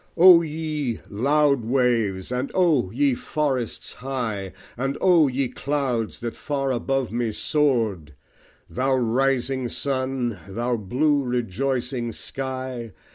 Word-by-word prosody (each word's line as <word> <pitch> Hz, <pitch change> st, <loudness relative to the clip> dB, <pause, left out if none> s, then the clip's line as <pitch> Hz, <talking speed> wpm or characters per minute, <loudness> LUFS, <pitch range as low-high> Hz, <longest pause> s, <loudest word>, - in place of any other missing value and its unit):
O 175 Hz, 0 st, +9 dB
ye 155 Hz, -6 st, -3 dB
loud 140 Hz, +4 st, +2 dB
Waves! 115 Hz, -6 st, +1 dB
and 125 Hz, +2 st, -1 dB
O 160 Hz, -, +3 dB
ye 135 Hz, +5 st, +2 dB
Forests 130 Hz, -2 st, -2 dB
high! 115 Hz, -7 st, -4 dB, 0.2 s
And 135 Hz, +3 st, -2 dB
O 175 Hz, -5 st, +5 dB
ye 135 Hz, 0 st, 0 dB
Clouds 130 Hz, -5 st, -2 dB
that 115 Hz, -1 st, -4 dB
far 135 Hz, -2 st, -2 dB
above 130 Hz, +1 st, -1 dB
me 120 Hz, -1 st, -1 dB
soar'd! 110 Hz, -, 0 dB, 0.5 s
Thou 130 Hz, +1 st, 0 dB
rising 130 Hz, +1 st, +1 dB
Sun! 130 Hz, -6 st, -2 dB
thou 120 Hz, +5 st, -1 dB
blue 140 Hz, +8 st, +1 dB
rejoicing 125 Hz, +1 st, -2 dB
Sky! 130 Hz, -4 st, -5 dB
130 Hz, 115 wpm, -24 LUFS, 120-140 Hz, 0.5 s, O